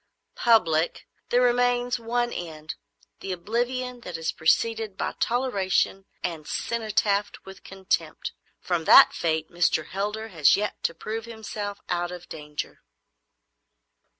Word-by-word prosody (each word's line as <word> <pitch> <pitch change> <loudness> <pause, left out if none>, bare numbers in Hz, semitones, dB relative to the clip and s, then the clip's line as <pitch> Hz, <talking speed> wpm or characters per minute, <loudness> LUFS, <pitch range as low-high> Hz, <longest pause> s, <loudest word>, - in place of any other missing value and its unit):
"——"public, 175 -9 +3 0.2
there 245 +1 +4
remains 245 0 +2
but 230 -1 -15
one 240 0 0
end,—the 155 +2 -8
oblivion 245 +7 -2
that 180 -6 -6
is 165 0 -1
preceded 220 +5 +1
by - - -2
toleration 195 -6 +1 0.2
and 160 -4 -4
cenotaphed 210 -3 0
with 195 0 -12
contempt. 190 0 -2 0.3
From 175 -3 -1
that - - +9
fate 160 -1 -1
Mr. 170 -3 +2
Heldar 210 +3 -3
has 160 -5 +4
yet 210 +1 -3
to 165 - 0
prove 220 +6 -5
himself 210 -3 -6
out 175 0 -1
of 180 -1 -9
danger." 150 -1 -6
200 Hz, 125 wpm, -26 LUFS, 170-230 Hz, 0.3 s, that